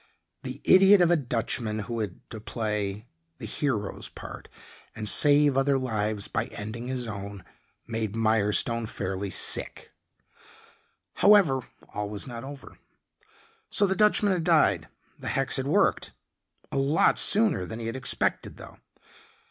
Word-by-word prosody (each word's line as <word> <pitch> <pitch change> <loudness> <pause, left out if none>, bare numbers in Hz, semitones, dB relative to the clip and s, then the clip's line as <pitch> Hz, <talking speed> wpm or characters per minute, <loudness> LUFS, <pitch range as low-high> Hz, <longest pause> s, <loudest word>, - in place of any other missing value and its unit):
The 130 +2 -7
idiot 195 +2 +6
of 175 -1 +4
a - - +5
Dutchman 115 -5 -2
who 115 +3 -5
had 105 -5 -6
to 110 - -8
play 105 -2 -3 0.3
the - - -8
hero's 110 -9 -3
part - - -10 0.5
and 110 -1 -5
save 145 +5 +4
other 135 0 +2
lives 110 -5 -2
by - - -2
ending 115 +4 -7
his 130 -1 -3
own 100 -2 -7 0.4
made 110 -2 -4
Mirestone 110 +1 +1
fairly 95 -1 -4
sick. - - 0 1.3
However, 200 -10 +5 0.3
all 105 0 -3
was 105 -1 -5
not 120 -2 -8
over. 140 0 -11 0.9
So 205 - +2
the 190 -1 0
Dutchman 210 0 +3
had 175 -3 -2
died; 100 - +2 0.3
the - - -8
hex - - 0
had - - -2
worked - - +1 0.6
a - - -3
lot 140 +4 +3
sooner 210 - +4
than 110 - -7
he 115 - -6
had 115 - -4
expected 130 0 -2
though. - - -13
115 Hz, 140 wpm, -26 LUFS, 105-145 Hz, 1.3 s, idiot